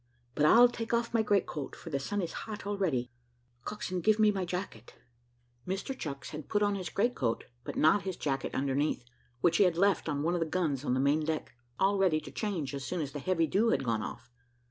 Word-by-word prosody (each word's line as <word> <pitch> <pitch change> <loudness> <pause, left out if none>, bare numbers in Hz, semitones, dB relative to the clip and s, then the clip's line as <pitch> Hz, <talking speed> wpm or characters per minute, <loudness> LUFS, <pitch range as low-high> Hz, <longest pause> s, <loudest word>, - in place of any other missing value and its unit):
But 150 - +2
I'll 240 +8 +8
take 235 -1 -2
off 235 0 -1
my 230 - +4
great 205 -3 +2
coat, 145 -3 -6
for 165 - -10
the 140 - 0
sun 200 +8 -2
is 170 - -4 0.2
hot 210 -2 -6
already. 180 -12 -1 0.5
Coxswain, 185 -3 -3
give 215 +3 +4
me 215 -1 +5
my 190 -2 -2
jacket." 180 - -6 0.7
Mr 195 +8 -3
Chucks, 140 - -6
had 155 -1 -7
put 210 -1 +2
on 205 0 +2
his 185 -4 -4
great 235 +8 +1
coat, 115 - -1 0.2
but - - -6
not 160 +6 +4
his 185 -1 -4
jacket 135 -2 -2
underneath, 140 -1 0 0.4
which 170 -1 +4
he - - +6
had 180 -3 +2
left 195 -3 +2
on 145 -1 -1
one 170 +2 +1
of 175 - 0
the 165 - 0
guns 155 -6 -1
on 125 - +1
the - - +1
main 145 +3 +2
deck, 155 0 -2 0.3
all 195 +1 +2
ready 180 -5 +3
to - - -10
change 180 - -3
as 140 -1 -4
soon 180 +7 -3
as 145 -3 -3
the 145 - -5
heavy 165 +2 +1
dew 210 +8 +2
had 225 - +1
gone 115 -3 0
off. 120 +2 -7
175 Hz, 235 wpm, -31 LUFS, 145-200 Hz, 0.7 s, I'll